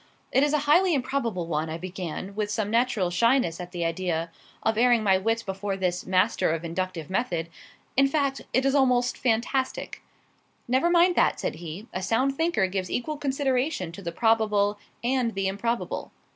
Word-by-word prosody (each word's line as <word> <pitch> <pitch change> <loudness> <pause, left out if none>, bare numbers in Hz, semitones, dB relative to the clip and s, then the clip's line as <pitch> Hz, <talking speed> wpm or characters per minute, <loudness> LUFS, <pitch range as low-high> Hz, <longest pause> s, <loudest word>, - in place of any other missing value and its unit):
"It 265 - +4
is 290 0 +3
a 300 - +3
highly 345 +3 +4
improbable 245 -9 -1
one," 160 -1 -2
I 160 - -4
began 185 +1 -6
with 210 0 -2
some 210 0 -1
natural 230 -6 +1
shyness 230 -3 +2
at 180 0 -8
the 175 -2 -2
idea 165 -1 -2 0.3
of 220 - +2
airing 240 0 +4
my 190 -2 +4
wits 225 +3 0
before 195 0 -3
this 180 -2 -2
master 185 0 +2
of 165 +1 -2
inductive 170 -2 -3
method; 175 -5 -1 0.5
"in 275 +1 +5
fact, 275 -1 0
it 260 +1 +2
is 275 - +3
almost 250 -3 +3
fantastic." 260 - -1 0.7
"Never 260 +7 +2
mind 350 +1 +4
that," - - +3
said - - -3
he. 170 +5 -7
"A 185 - -3
sound 240 +8 +1
thinker 325 - +1
gives 185 -1 -3
equal 300 +5 -2
consideration 270 - -1
to 170 - -10
the 170 -3 -4
probable 210 -1 +2 0.2
and 245 -2 0
the 195 0 0
improbable." 230 +5 -2
215 Hz, 175 wpm, -26 LUFS, 185-260 Hz, 0.7 s, in